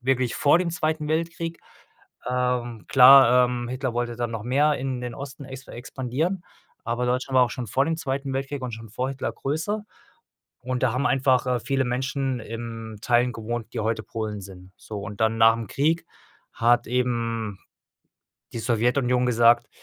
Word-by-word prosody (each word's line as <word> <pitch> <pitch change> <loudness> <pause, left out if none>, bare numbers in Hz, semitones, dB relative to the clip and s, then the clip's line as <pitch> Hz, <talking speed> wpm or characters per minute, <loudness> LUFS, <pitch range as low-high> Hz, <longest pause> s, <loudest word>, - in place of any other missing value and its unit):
wirklich 130 -1 0
vor 145 +3 +4
dem 175 -1 -1
2. 155 -2 -1
Weltkrieg. 165 +1 -2 0.7
Ähm, 125 -3 -1
klar, 125 -1 +8
ähm, 120 -1 -4
Hitler 130 0 -3
wollte 120 -1 -2
dann 120 -1 -2
noch 115 -2 -4
mehr 145 +4 +2
in 130 -1 -3
den 120 -1 -5
Osten 140 +1 -8
ex 135 0 -10
expandieren, 135 +9 -3 0.4
aber 120 +2 -1
Deutschland 130 +2 -1
war 125 - +7
auch 120 - -4
schon 125 0 -5
vor 130 +6 +1
dem 165 +2 -1
2. 135 -2 -3
Weltkrieg 135 0 -3
und 125 - -4
schon 115 +1 -8
vor 125 +5 -2
Hitler 135 -1 -3
größer. 185 +10 -3 0.8
Und 125 0 -3
da 130 -3 +3
haben 130 +4 0
einfach, 130 -1 +2
äh, 125 -1 0
viele 135 +2 0
Menschen 130 +1 -2
in 115 -1 -7
Teilen 125 +1 +2
gewohnt, 115 0 -5
die 115 - -1
heute 110 0 -1
Polen 110 -2 -5
sind. 95 -1 -12
So 105 -2 -7
und 105 0 -8
dann 110 0 +2
nach 115 0 +7
'm 115 - -5
Krieg 160 +4 +1 0.5
hat 120 +1 +2
eben 115 -4 -1 1.0
die 115 - -4
Sowjetunion 125 +2 +1
gesagt: 120 0 +4
125 Hz, 175 wpm, -25 LUFS, 115-135 Hz, 1.0 s, klar